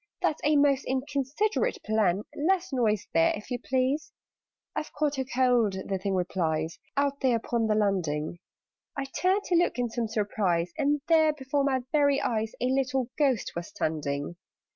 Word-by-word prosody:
That's 335 -4 0
a 300 +1 +3
most 285 -1 +4
inconsiderate 285 - -1
plan. 210 -3 +1
Less 370 +2 0
noise 215 -5 +1
there, 165 0 +4
if 210 +4 -10
you 245 - -1
please!" 265 - 0 0.6
"I've 305 - -3
caught 290 -2 0
a 265 - -1
cold," 245 -5 +2
the 190 0 -3
Thing 195 +1 -1
replies, 170 -2 -1 0.2
"Out 280 0 +1
there 260 -3 +3
upon 230 0 0
the 215 - +2
landing." 175 -6 0 0.6
I 275 - -1
turned 370 +8 +1
to 355 - 0
look 345 -4 +2
in 245 -1 0
some 235 -1 -1
surprise, 200 -5 0
And 295 -1 +1
there, 315 -2 +5
before 280 0 -1
my 265 -2 +1
very 285 -2 +3
eyes, 220 -1 -1
A - - 0
little 260 -1 0
Ghost 270 -7 +1
was 170 0 -4
standing! 150 +1 -3
255 Hz, 165 wpm, -28 LUFS, 200-285 Hz, 0.6 s, there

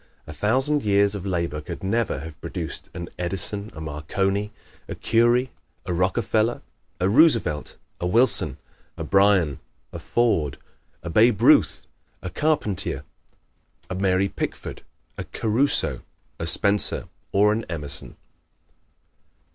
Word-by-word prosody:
A 75 - -9
thousand 130 - +1
years 100 0 +3
of 100 -1 -5
labor 85 -4 -2
could 75 - -8
never 100 - -1
have 80 -2 -10
produced - - -6
an 85 -1 -6
Edison, 95 +3 -4
a - - -8
Marconi, 95 +7 -2 0.4
a - - -6
Curie, 120 +3 +2 0.3
a 90 - -2
Rockefeller, 110 +5 0 0.4
a 90 - +1
Roosevelt, 115 - +2 0.2
a 90 - -2
Wilson, 90 - +4 0.4
a - - -4
Bryan, 95 -7 +3 0.3
a - - -6
Ford, 100 - 0 0.5
a 85 - -5
Babe 110 +2 +4
Ruth, - - +4 0.4
a 90 - -5
Carpentier, 105 - -1 0.9
a - - -1
Mary 95 0 +1
Pickford, - - -5 0.4
a - - -2
Caruso, 110 - +1 0.4
a 80 - -2
Spencer 100 +4 +5 0.2
or 105 +2 +4
an 115 +1 -2
Emerson. 75 -4 -5
100 Hz, 125 wpm, -23 LUFS, 85-110 Hz, 0.9 s, Spencer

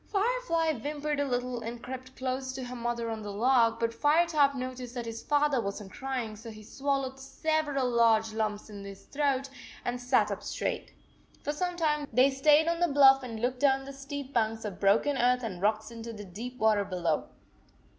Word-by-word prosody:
Firefly 400 -7 +1
whimpered 295 +2 -2
a 285 - +1
little 245 -1 -2
and 235 +1 -6
crept 260 0 -8
close 260 0 -3
to 260 0 -5
her 250 0 -6
mother 235 -1 -2
on 220 -1 -4
the 205 -1 -5
log, 230 +2 +3
but 230 0 0
Firetop 295 +1 +3
noticed 255 -1 -5
that 240 -1 -3
his 230 0 -6
father 290 -3 +2
was 200 0 -4
n 205 -2 -10
t - - -18
crying, 255 -5 -3
so 225 +2 -10
he 215 -1 -11
swal 275 +4 -1
lowed 265 0 -6
several 290 -1 -1
large 225 -2 +3
lumps 215 -1 -2
in 205 -2 -9
his 200 -1 -10
throat 275 -2 0 0.4
and 245 0 -1
no - - -12
sat 245 -4 +2
up 200 - -4
straight. - - -3 0.5
For 295 - -1
some 355 +3 -2
time 300 -3 +1
they 255 +4 +5
stayed 295 +4 +4
on 335 0 +1
the 350 - +3
bluff 275 -2 +6
and 230 -4 -6
looked 250 +2 -1
down 270 -1 +3
the 275 - -8
steep 275 0 -7
banks 225 -1 0
of 195 -3 -5
broken 220 +8 +3
earth 250 +1 +3
and 185 -6 -5
rocks 215 +2 0
into 230 0 -7
the 205 -1 -8
deep 230 +7 -7
water 215 -3 +3
below. 175 -5 -1
250 Hz, 205 wpm, -29 LUFS, 225-280 Hz, 0.5 s, bluff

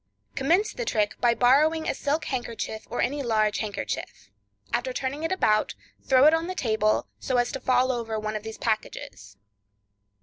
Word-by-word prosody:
Commence 355 +11 +1
the - - -4
trick 210 - -1
by 235 -1 +4
borrowing 305 +7 +3
a - - +1
silk 295 +3 -1
handkerchief, 230 -3 -4
or - - -1
any 285 +2 -1
large 215 -4 +1
handkerchief. 200 - -5 0.4
After 260 - -1
turning 265 +3 -3
it 325 - -2
about, 215 - +2 0.3
throw 260 -1 +4
it 305 - +7
out 325 - +4
on 330 - -5
the 370 - -4
table, 215 - +1
so 255 - -1
as 245 0 +1
to 270 - -4
fall 255 0 +2
over 225 -3 -3
one 215 0 -3
of 215 - -3
these 220 +1 -8
packages. 105 - -4
245 Hz, 180 wpm, -26 LUFS, 215-285 Hz, 0.4 s, it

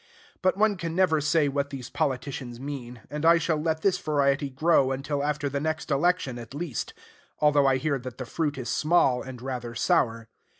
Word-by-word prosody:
But 185 0 +2
one 210 -1 +3
can 165 -2 -4
never 175 -5 +3
say 155 0 +2
what 140 0 -1
these 130 -3 -7
politicians 130 -4 -3
mean; 125 -4 -7
and 150 +1 -4
I 165 +1 +7
shall 160 -2 0
let 160 0 -1
this 190 -2 +2
variety 140 -2 +1
grow 135 0 +3
until 140 +2 -2
after 150 0 -1
the 140 0 -2
next 155 +2 -3
election, 140 -4 +1
at 120 +3 -10
least; 150 -6 -4 0.4
although 145 -2 +4
I 135 -1 +3
hear 140 +1 -1
that 125 0 -8
the 130 - -5
fruit 145 +2 -2
is 125 -2 -5
small, 150 -6 +2
and 130 -2 -8
rather 125 -3 -5
sour. 115 -1 +1
140 Hz, 195 wpm, -26 LUFS, 130-160 Hz, 0.4 s, I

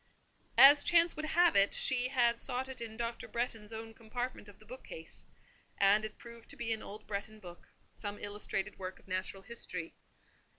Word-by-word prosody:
As 285 +1 +9
chance 340 0 +4
would 310 - -4
have 345 +2 +4
it, 200 0 +5
she 250 -1 +3
had 240 -3 +2
sought 255 +1 -2
it 265 -2 -7
in 220 -1 -6
Dr. 235 0 -3
Bretton's 230 -3 -3
own 225 0 -7
compartment 230 0 -5
of 200 - -15
the 215 - -19
bookcase; 215 -9 -8 0.5
and 200 +2 +5
it 215 - -6
proved 235 -1 -13
to - - -4
be 235 -3 -1
an 220 - -5
old 210 +1 -9
Bretton 215 +1 -5
book—some 205 +2 -10
illustrated 205 -1 -3
work 185 0 -5
of - - -21
natural 185 +1 -3
history. 180 -6 -6
225 Hz, 175 wpm, -33 LUFS, 205-250 Hz, 0.5 s, As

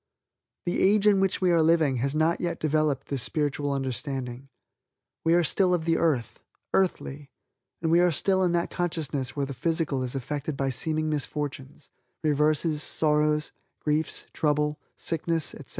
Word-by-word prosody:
The 175 - 0
age 205 +1 +4
in 205 -2 +5
which 195 -1 +1
we 180 -1 +3
are 170 -1 +4
living 160 -4 +3
has 135 +4 -1
not 160 +2 +2
yet 170 -1 -2
developed 155 -3 0
this 140 -3 -1
spiritual 145 -1 -1
understanding. 135 -1 -4 0.7
We 165 +1 +4
are 175 - +4
still 180 +3 +3
of 160 -2 -3
the 165 -1 +2
earth 140 -9 0 0.3
earthly 150 -6 -1 0.5
and 160 - +1
we 170 - +5
are 180 0 +5
still 190 +4 +1
in 180 -2 +2
that 170 0 0
consciousness 155 -7 -2
where 140 -1 0
the 140 - -6
physical 160 -1 -1
is 130 +1 -4
affected 145 +2 -3
by 135 0 0
seeming 155 +5 -1
misfortunes, 145 -1 -4 0.3
reverses, 150 +1 +2
sorrows, 150 -1 +1 0.3
griefs, 150 +1 -1
trouble, 150 0 0 0.2
sickness, 165 -1 -1
etc. - - -11
150 Hz, 160 wpm, -27 LUFS, 140-165 Hz, 0.7 s, in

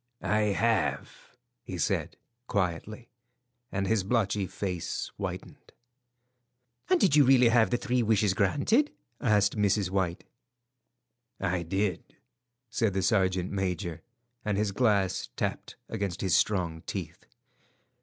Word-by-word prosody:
"I 105 -1 +1
have," 115 -3 -1 0.3
he - - -6
said, - - -1 0.3
quietly, 100 +4 -2 0.6
and 100 0 -1
his 105 -1 +1
blotchy 100 -2 0
face 90 -4 -4
whitened. - - -7 1.2
"And 370 -1 +4
did 175 - +4
you 150 - +7
really 125 -2 +6
have 115 -3 +4
the 120 - +1
three 125 -1 0
wishes 105 -3 +2
granted?" 145 - +2 0.3
asked 105 -5 +2
Mrs. 100 -2 +1
White. 95 -3 -1 1.2
"I 95 -2 0
did," 95 +3 -2 0.6
said 115 -5 0
the 95 - 0
sergeant 95 -2 +1
major, 90 -4 -2 0.4
and 105 -2 -1
his 105 -1 0
glass 100 -4 +1
tapped - - -3
against 100 -2 -3
his 95 -3 +2
strong 85 -6 +1
teeth. - - -6
100 Hz, 120 wpm, -28 LUFS, 95-115 Hz, 1.2 s, you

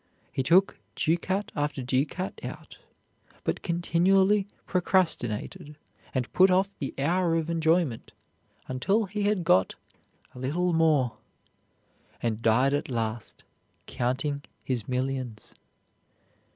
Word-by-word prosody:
He - - -1
took 180 +8 +3 0.2
ducat 185 +5 0
after 145 -3 -2
ducat 140 +9 -2
out, - - -8 0.6
but - - -2
continually 190 +4 +2 0.2
procrastinated 150 - 0 0.4
and 130 -1 -2
put 190 +1 +6
off 190 +2 +2
the 140 - -4
hour 170 +4 +1
of 165 0 -1
enjoyment 160 -6 +1 0.6
until 195 - +1
he 205 +2 -4
had 205 -3 +1
got 95 - +3 0.6
"a 125 - -11
little 170 +7 0
more," 155 -7 +2 1.0
and 115 -1 -2
died 125 +4 +3
at 145 - -1
last 115 -2 -4 0.4
counting 130 +4 -2 0.2
his 125 -5 -2
millions. 130 -3 -3
150 Hz, 110 wpm, -27 LUFS, 130-180 Hz, 1.0 s, put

